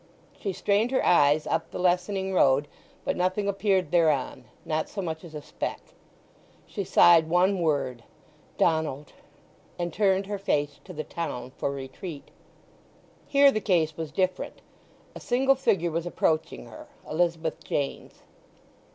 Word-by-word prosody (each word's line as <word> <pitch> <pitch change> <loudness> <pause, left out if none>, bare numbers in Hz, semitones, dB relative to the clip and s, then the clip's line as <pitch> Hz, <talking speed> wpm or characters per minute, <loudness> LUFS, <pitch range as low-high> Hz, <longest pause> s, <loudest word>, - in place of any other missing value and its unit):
She 200 - -2
strained 205 +5 +1
her 260 - +1
eyes 150 -3 +4
up - - -1
the - - -7
lessening 185 +2 0
road, 140 -4 +3 0.4
but - - 0
nothing 185 +3 0
appeared 195 -2 +1
thereon—not 155 -2 0
so 205 - -7
much 160 -3 -4
as 165 -3 -11
a 150 - -6
speck. - - -4 0.9
She - - -4
sighed 165 -2 +5
one 185 +3 +3
word—"Donald!" 150 +1 -2 0.6
and 175 -2 -3
turned 195 0 +2
her 205 0 -4
face 145 -6 -1
to 180 - -9
the 155 -1 -4
town 130 -8 -5
for 140 - -3
retreat. 140 +3 -7 1.0
Here 280 -1 +6
the 215 - -2
case 165 -6 +1
was 160 -2 -5
different. 185 -1 -2 0.5
A - - -9
single 265 +3 +2
figure 185 -10 +1
was 165 +2 -2
approaching 160 -2 -1
her—Elizabeth 170 - -3
Jane's. 140 -1 -4
175 Hz, 135 wpm, -27 LUFS, 155-195 Hz, 1.0 s, Here